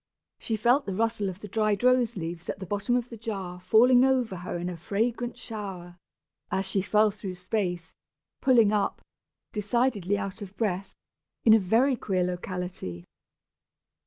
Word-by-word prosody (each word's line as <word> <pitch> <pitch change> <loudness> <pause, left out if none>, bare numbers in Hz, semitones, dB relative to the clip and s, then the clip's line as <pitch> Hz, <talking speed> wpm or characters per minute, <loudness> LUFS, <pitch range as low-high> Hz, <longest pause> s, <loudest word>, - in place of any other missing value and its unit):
She 225 - -2
felt 245 +5 +3
the 195 - -2
rustle 220 -2 0
of 190 +2 -8
the 210 - -7
dried 215 +1 0
rose 250 -4 +3
leaves 170 0 -5
at - - -2
the 190 - -7
bottom 205 +6 0
of 245 0 -1
the 230 - -8
jar 195 -5 -5
falling 245 +7 +5
over 255 -7 +2
her 180 0 -4
in 175 +1 -3
a 180 - -4
fragrant 230 +8 -2
shower, 190 -7 -7 0.5
as 190 0 -1
she 195 0 +1
fell 210 +2 +3
through 195 -3 -6
space, 180 -2 -3 0.5
pulling 235 -6 +5
up, 210 -1 0 0.5
decidedly 210 -2 +1
out 195 +2 -5
of 200 -1 -9
breath, 195 -3 -2 0.5
in 220 - +8
a 220 - +7
very 230 +8 +3
queer 190 -5 -1
locality. 180 - -4
205 Hz, 160 wpm, -27 LUFS, 185-230 Hz, 0.5 s, in